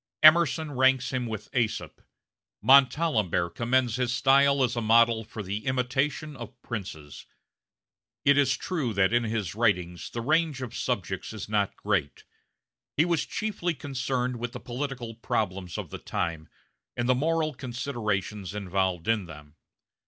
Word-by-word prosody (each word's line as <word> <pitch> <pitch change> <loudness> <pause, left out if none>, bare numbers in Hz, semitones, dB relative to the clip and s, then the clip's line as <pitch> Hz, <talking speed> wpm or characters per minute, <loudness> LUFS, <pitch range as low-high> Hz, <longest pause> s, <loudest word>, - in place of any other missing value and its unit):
Emerson 155 -1 +6
ranks 130 -1 +3
him 125 -2 -1
with 110 -3 -5
Aesop; 115 -3 -1 0.6
Montalembert 125 - +4
commends 120 +1 +1
his 125 -1 0
style 140 +2 +4
as 120 -1 0
a 120 - -1
model 115 0 +4
for 110 0 -7
the 100 +3 -4
imitation 130 +4 -1
of 125 -2 -10
princes. 90 - -7 1.0
It 140 - +6
is 140 -1 +3
true 145 - -2
that 95 +2 +3
in 120 0 +3
his 110 -6 -2
writings 90 -6 0
the 115 - -4
range 155 0 +1
of 120 - -7
subjects 95 -5 -3
is 110 - -6
not 105 -2 0
great. 95 -9 -1 0.7
He 155 - +5
was 170 -3 0
chiefly 195 -6 -2
concerned 130 -3 -2
with 120 +1 -4
the 125 - -6
political 125 -2 -5
problems 95 -5 -2
of - - -6
the - - -6
time, 80 -2 -3 0.5
and 120 0 0
the 130 - +5
moral 155 +3 0
considerations 110 -7 -3
involved 95 -3 -1
in 110 -4 +1
them. 75 -2 -12
120 Hz, 145 wpm, -27 LUFS, 105-135 Hz, 1.0 s, Emerson